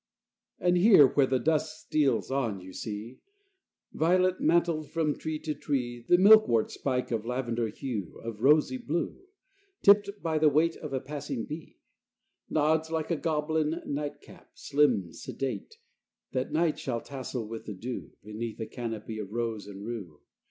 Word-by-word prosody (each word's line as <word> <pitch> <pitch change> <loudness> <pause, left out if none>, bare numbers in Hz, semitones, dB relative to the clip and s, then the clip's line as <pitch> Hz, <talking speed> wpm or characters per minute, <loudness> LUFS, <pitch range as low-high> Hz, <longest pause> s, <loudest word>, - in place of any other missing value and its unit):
XII - - -2
And 180 0 +5
here 185 -5 +8
where 135 +1 +3
the 130 - +2
dusk 155 +3 0
steals 140 -5 +1
on, 120 -8 -1
you 95 0 -11
see, 110 +5 -6 0.7
Violet 185 +3 +2
mantled, 165 -1 +2
from 160 -3 0
tree 155 -1 -4
to 155 0 -3
tree, 120 -5 -3
The 175 - +7
milkwort's 185 - +6
spike 125 -3 -2
of 115 -2 -1
lavender 120 -1 -1
hue, 110 - -5
Of 115 -2 -6
rosy 140 -1 +4
blue, 165 - -3 0.6
Tipped 205 0 +6
by 160 -2 0
the 155 0 +5
weight 160 +3 +2
of 150 - -7
a 135 - 0
passing 140 -4 -5
bee, 155 +2 -8 0.7
Nods 160 +1 +2
like 160 0 -2
a - - +3
goblin 155 0 0
night 145 0 -4
cap, - - -16
slim, 125 - +1
sedate, 135 - -5 0.5
That 130 0 -2
night 160 0 +1
shall 120 -3 -2
tassel 130 -4 -5
with 115 0 -7
the 105 - -5
dew, 120 +6 -6
Beneath 110 +2 -6
a 110 - -2
canopy 115 -3 -5
of 100 -2 -6
rose 115 -3 -3
and 100 0 -8
rue. 100 -10 -6
135 Hz, 160 wpm, -29 LUFS, 115-155 Hz, 0.7 s, here